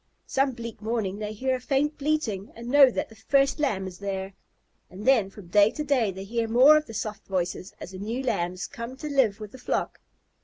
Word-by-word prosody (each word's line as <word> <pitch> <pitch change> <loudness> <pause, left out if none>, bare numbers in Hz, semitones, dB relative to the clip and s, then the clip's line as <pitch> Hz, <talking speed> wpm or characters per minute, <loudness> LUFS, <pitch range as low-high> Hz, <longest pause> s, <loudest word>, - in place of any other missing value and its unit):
Some 270 0 +1
bleak 230 -3 -8
morning 215 -3 -2
they 210 0 -4
hear 260 +5 -1
a 255 - -1
faint 285 +4 0
bleating 275 -10 -1
and 235 +1 -8
know 280 -2 +8
that - - -3
the 225 - -15
first 275 +6 +2
Lamb 215 -11 0
is 185 -1 -8
there. 195 -1 -4 0.6
And 195 +4 -9
then 235 -7 +4
from 195 -3 -13
day 205 +3 +6
to 300 - -4
day 270 -7 +2
they 190 0 -6
hear 225 +3 -2
more 255 +7 +7
of 305 0 +1
the 225 - -9
soft 210 -1 -5
voices 185 0 -3
as - - -8
the 185 - -8
new 230 +6 -3
Lambs 180 -6 -1
come 240 +2 -7
to 300 - -6
live 260 -8 +2
with 210 -2 -8
the 260 - -12
flock. - - -2
225 Hz, 225 wpm, -26 LUFS, 195-265 Hz, 0.6 s, know